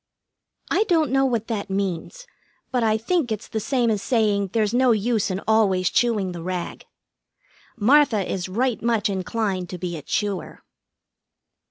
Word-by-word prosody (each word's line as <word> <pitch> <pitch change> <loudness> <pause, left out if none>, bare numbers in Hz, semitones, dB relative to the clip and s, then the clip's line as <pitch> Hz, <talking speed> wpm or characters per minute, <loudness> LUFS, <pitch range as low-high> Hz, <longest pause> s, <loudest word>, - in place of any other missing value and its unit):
I 435 - +3
don't 320 - +2
know 270 0 +3
what 235 -4 0
that 210 -4 -4
means, 195 - -3 0.5
but 250 -2 +1
I 220 -1 +2
think 265 +2 0
it's 215 +1 -4
the 220 - -3
same 240 0 +1
as 210 -2 -1
saying 210 -5 +1
there's 215 0 +1
no 250 -1 +4
use 220 0 0
in 190 +1 -3
always 195 -5 +3
chewing 215 -6 +1
the 170 -1 -7
rag. 180 0 -5 0.9
Martha 230 -4 +4
is 185 -1 -3
right 240 +4 0
much 225 -3 +1
inclined 190 -1 -2
to 180 - -5
be 175 -1 -4
a 155 - -6
chewer. 200 +5 -3
215 Hz, 160 wpm, -23 LUFS, 190-240 Hz, 0.9 s, no